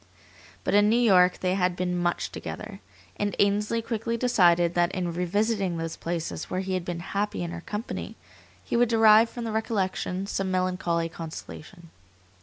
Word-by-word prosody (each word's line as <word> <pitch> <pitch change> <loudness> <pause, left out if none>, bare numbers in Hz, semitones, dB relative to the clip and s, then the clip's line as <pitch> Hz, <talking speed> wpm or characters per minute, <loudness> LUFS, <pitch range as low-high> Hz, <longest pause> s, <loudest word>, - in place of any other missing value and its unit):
But - - -1
in 205 +1 +5
New 225 - +3
York 185 -6 +4
they 185 0 +1
had 180 -2 +1
been 180 0 -1
much 175 -1 -1
together. - - -7 0.4
And 205 -1 -1
Ainsley 210 +3 +1
quickly 230 0 -2
decided 175 -8 +3
that 175 0 +2
in 175 -2 -2
revisiting 195 +1 0
those 165 0 -4
places 170 -1 -4
where 185 - -1
he 190 0 -3
had 185 -1 -1
been 170 -1 -4
happy 200 +1 -2
in 170 - -4
her 170 -1 -6
company 210 +5 -5 0.5
he - - -2
would 240 -1 +3
derive 225 0 +6
from 240 - -7
the 225 - -3
recollection 195 -4 -1
some 195 -1 -2
melancholy 180 -2 0
consolation. 165 +1 -9
185 Hz, 170 wpm, -26 LUFS, 175-215 Hz, 0.5 s, derive